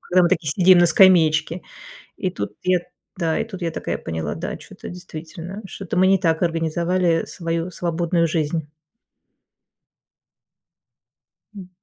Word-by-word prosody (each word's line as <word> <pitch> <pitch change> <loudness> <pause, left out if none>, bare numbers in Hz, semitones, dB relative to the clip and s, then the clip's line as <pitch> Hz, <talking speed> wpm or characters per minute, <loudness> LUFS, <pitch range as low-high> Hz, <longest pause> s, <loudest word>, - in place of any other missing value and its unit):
Когда 180 0 +3
мы 175 - +4
такие, 160 -3 0
сидим 180 +3 +6
на 175 - +6
скамеечке. 165 -2 +4 0.5
И 185 - -2
тут - - -5
я 180 -1 +2 0.4
да, 165 -3 0
и - - -1
тут 200 -5 -9
я 165 - 0
такая - - -4
поняла, 80 -1 -4
да, - - -5
чё-то - - -11
действительно, 175 +3 -8
что-то 190 -2 -6
мы 185 +1 +5
не 195 0 +4
так 165 -1 +1
организовали 170 +1 +1
свою 165 0 -3
свободную 170 -1 0
жизнь. 155 -1 -2 2.8
М. 190 -3 -10
170 Hz, 135 wpm, -22 LUFS, 165-185 Hz, 2.8 s, сидим